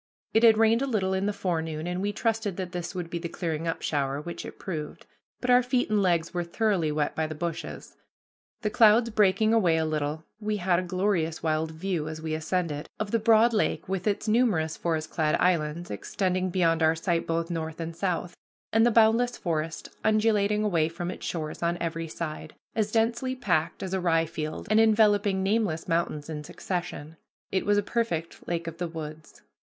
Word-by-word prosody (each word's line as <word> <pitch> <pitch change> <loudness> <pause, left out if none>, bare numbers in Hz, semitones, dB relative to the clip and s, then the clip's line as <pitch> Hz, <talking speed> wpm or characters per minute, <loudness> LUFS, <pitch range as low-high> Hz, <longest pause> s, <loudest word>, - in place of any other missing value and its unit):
It 225 - +4
had 225 -2 +7
rained 225 +2 +4
a 275 - 0
little 195 -6 0
in 190 +1 0
the - - +1
forenoon, 160 -5 -2
and 180 +1 -2
we 205 +1 0
trusted 220 -2 -1
that 185 -2 -4
this 180 0 -5
would 175 -2 -4
be 170 - -2
the 170 0 -5
clearing 165 -2 -3
up 165 - -2
shower, 140 -2 0
which 170 +3 -6
it - - -10
proved; 155 -5 -6 0.3
but 250 - 0
our 250 0 +7
feet 250 -2 0
and 210 -1 +3
legs 170 -3 +1
were 175 -1 -1
thoroughly 175 -3 0
wet 150 -1 0
by 160 0 0
the 155 - -6
bushes. 170 +1 -5 0.7
The 210 - 0
clouds 225 +2 +5
breaking 215 +1 +3
away 180 -8 +4
a 160 - +1
little, 155 0 -2 0.2
we 210 -1 -1
had 180 -2 +2
a - - 0
glorious 180 -3 -1
wild 160 0 0
view, 160 -1 -3
as 155 0 -5
we 160 0 -3
ascended, 155 -1 -2
of 210 -1 -3
the 230 - +2
broad 225 +2 +5
lake 215 - 0
with 190 +1 -2
its 210 +1 0
numerous 215 -9 +2
forest 160 -2 -2
clad 155 -2 +1
islands 170 -1 0
extending 185 - -1
beyond 170 -2 +2
our 160 0 +4
sight 165 0 -1
both 165 +1 -1
north 160 -1 -4
and 165 0 -5
south, 180 -1 -2 0.4
and 225 +1 +5
the 240 - +5
boundless 230 +2 +4
forest 165 -1 -3 0.2
undulating 215 -1 +2
away 165 -6 +2
from 175 +1 -4
its - - -7
shores 155 -3 -4
on 170 0 0
every 165 -1 -3
side, 155 -1 -6 0.2
as 215 -2 0
densely 235 +3 +1
packed 175 -9 0
as 190 0 -4
a 190 - +1
rye 165 -2 +3
field 155 -1 -5
and 215 - +5
enveloping 210 -3 +4
nameless 195 -5 0
mountains 165 -3 -1
in 150 -2 -5
succession. 170 -2 -5 0.3
It 190 +1 -1
was 205 0 +4
a 205 - +2
perfect 200 -8 -2
lake 170 -1 -2
of 165 0 -7
the 175 - -1
woods. 155 -1 -9
175 Hz, 200 wpm, -27 LUFS, 160-210 Hz, 0.7 s, had